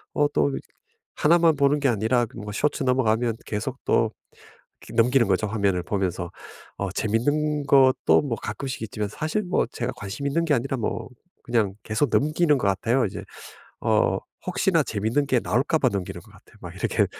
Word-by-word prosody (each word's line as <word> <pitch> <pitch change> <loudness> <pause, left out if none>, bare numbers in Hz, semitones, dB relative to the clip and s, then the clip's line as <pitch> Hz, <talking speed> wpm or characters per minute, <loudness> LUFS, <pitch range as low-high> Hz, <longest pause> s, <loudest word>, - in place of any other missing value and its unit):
어 145 0 +3
또 70 -2 +2
이 65 - -3 0.6
하나만 165 0 +4
보는 140 +1 +2
게 140 - +1
아니라 115 +2 +2
그 115 - -14
뭐 105 0 -6
쇼츠 145 +6 0
넘어가면 120 -3 +1
계속 105 -1 -3
또 - - +3 0.8
그 - - -12
넘기는 120 +2 +4
거죠, 95 +2 +1
화면을 100 -4 0
보면서. 90 -3 -2 0.5
어 100 -2 -3
재밌는 145 +8 0
것도 135 -2 +5
뭐 130 -6 -2
가끔씩 130 -4 -5
있지만 105 -1 -3
사실 155 - -2
뭐 180 - +1
제가 120 +1 -3
관심이 115 +8 -4
있는 165 +4 +1
게 155 - +2
아니라 135 +1 0
뭐 115 - -3 0.4
그냥 110 -5 +1
계속 110 +5 0
넘기는 155 +1 +3
것 105 - 0
같아요, 115 +6 +1
이제. 95 - -5 0.6
어 - - +2 0.3
혹시나 - - +2
재밌는 115 +8 -1
게 130 -3 +2
나올까 120 - +1
봐 130 - +3
넘기는 95 -3 -4
것 - - -19
같아요. - - -20
막 - - -9
이렇게 - - +1
120 Hz, 345 characters per minute, -24 LUFS, 105-145 Hz, 0.8 s, 것도